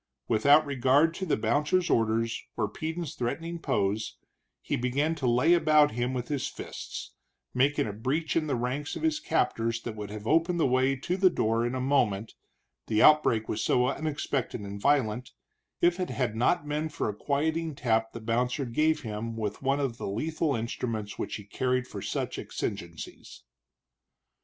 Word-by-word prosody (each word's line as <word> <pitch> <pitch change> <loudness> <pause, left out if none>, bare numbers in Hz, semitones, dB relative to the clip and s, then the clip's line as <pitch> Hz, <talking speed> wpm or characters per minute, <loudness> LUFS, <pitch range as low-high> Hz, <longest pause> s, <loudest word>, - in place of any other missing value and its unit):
Without 145 +8 +5
regard 140 +4 +3
to 190 +2 -4
the - - +2
bouncer's 150 +11 +1
orders 115 0 +1
or - - +1
Peden's 160 +7 -4
threatening 165 +7 -3
pose, 105 -6 -1 0.4
he - - -2
began 135 +6 0
to 145 -6 -2
lay 125 +8 +4
about 155 -3 +5
him 120 +2 -1
with 125 -2 -3
his 145 -1 -1
fists, - - -7 0.4
making 140 +4 +2
a 105 - -4
breach 140 +9 -1
in 155 -2 +1
the 140 - 0
ranks 125 +5 -2
of - - -6
his 315 -1 +1
captors 115 - 0
that 115 - -5
would 105 -1 -6
have 105 0 -7
opened 165 +6 +2
the - - +3
way 130 +1 +2
to 175 +7 -2
the 190 -1 +5
door 115 -8 +1
in 120 +2 -1
a - - -1
moment, 120 -6 +1 0.5
the 110 -1 +1
outbreak 150 -8 +5
was - - -2
so 125 0 +3
unexpected 145 -5 -2
and 100 0 -7
violent, 125 -4 +1 0.5
if 175 +1 +3
it 180 - -1
had 125 -4 -1
not 125 +5 +1
been 150 +2 -1
for 145 - -2
a 105 - -2
quieting 155 +6 -1
tap 115 -3 +1
the - - -7
bouncer 125 +4 0
gave 155 +6 +1
him 115 +1 -4
with 105 -2 -3
one 135 +1 +1
of 130 -5 -2
the - - -4
lethal 150 +8 -1
instruments 110 -2 -4
which - - -3
he 105 - -7
carried 125 +5 -1
for - - -7
such - - -3
exigencies. 85 -2 -6
130 Hz, 175 wpm, -28 LUFS, 115-155 Hz, 0.5 s, Without